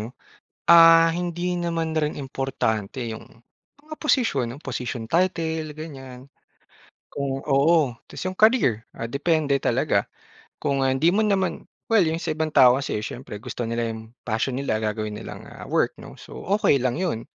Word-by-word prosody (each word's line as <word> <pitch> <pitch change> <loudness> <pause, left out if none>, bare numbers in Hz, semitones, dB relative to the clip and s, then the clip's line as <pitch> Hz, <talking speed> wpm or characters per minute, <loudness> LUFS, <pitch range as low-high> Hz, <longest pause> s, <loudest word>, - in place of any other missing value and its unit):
'no, 110 - -5 0.6
ah, 165 -1 +8
hindi 175 +1 -2
naman 165 -2 -2
rin 155 -1 -1
importante 130 -4 -2
yung 110 -1 -6 0.6
mga 305 +2 -11
posisyon, 140 - +1
yung - - -17
posisyon 125 -2 -4
title, 160 0 -1
ganyan. 135 -5 -9 0.9
Kung 135 -1 -3
oo 145 -1 +3
ta's 140 - -9
yung 185 0 -4
career 215 - +3
ah, 115 - -4
depende 145 0 +1
talaga - - +1 0.5
kung, 140 -2 0
ah, 130 - +2
hindi 135 +5 +2
mo 205 +5 +3
naman 195 -3 0 0.2
well 225 -5 +4
yung 160 +1 -1
sa - - -5
ibang 155 -1 -2
tao 125 -3 +7
kasi 135 -5 -2
siyempre 105 -1 -7
gusto 120 - -5
nila 115 0 -2
yung 110 0 -8
passion 115 +3 -2
nila 140 -5 -1
gagawin 105 0 -3
nilang 110 - -9
ah, - - -10
work - - 0
'no, - - -11
so - - -11 0.2
okey 145 - +4
lang 130 +3 -1
'yon. 160 -12 -2
140 Hz, 160 wpm, -24 LUFS, 120-165 Hz, 0.9 s, ah